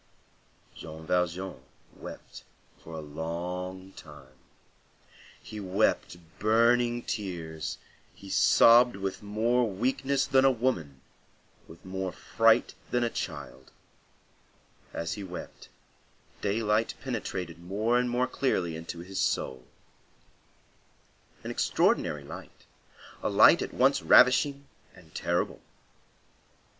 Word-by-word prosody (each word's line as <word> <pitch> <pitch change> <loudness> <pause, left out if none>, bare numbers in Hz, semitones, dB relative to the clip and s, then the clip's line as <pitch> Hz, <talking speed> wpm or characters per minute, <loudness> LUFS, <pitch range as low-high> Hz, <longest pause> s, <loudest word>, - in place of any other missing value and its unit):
Jean 80 +1 -9
Valjean 90 -2 -1 0.3
wept - - -10 0.4
for 80 - -12
a 80 - -5
long 90 +5 -5
time. 75 -7 -14 1.1
He 105 - -9
wept 95 -2 0 0.2
burning 120 +2 +3
tears, 80 -7 -4 0.4
he 100 - -13
sobbed 120 +4 +6
with 95 -1 -4
more 115 +3 +1
weakness 130 +6 0
than 130 0 +3
a 135 - +6
woman, 110 - -2 0.7
with 85 - -15
more 95 0 -3
fright 115 +6 +2 0.2
than 120 0 +1
a 120 - 0
child. 65 0 -6 1.2
As 85 -1 -3
he 105 - -6
wept, 90 -2 -9 0.7
daylight 105 +2 0
penetrated 85 -3 -4
more 105 +7 0
and 125 0 0
more 125 +1 +1
clearly 95 -12 -1
into 85 +1 -7
his 95 +2 -6
soul; 65 -1 -1 1.8
an - - -4
extraordinary 75 -1 +1
light; 70 - -11 0.6
a - - -1
light - - +6
at - - -4
once - - +3
ravishing 140 +3 +5 0.3
and - - -18
terrible. - - -1
95 Hz, 105 wpm, -28 LUFS, 85-120 Hz, 1.8 s, sobbed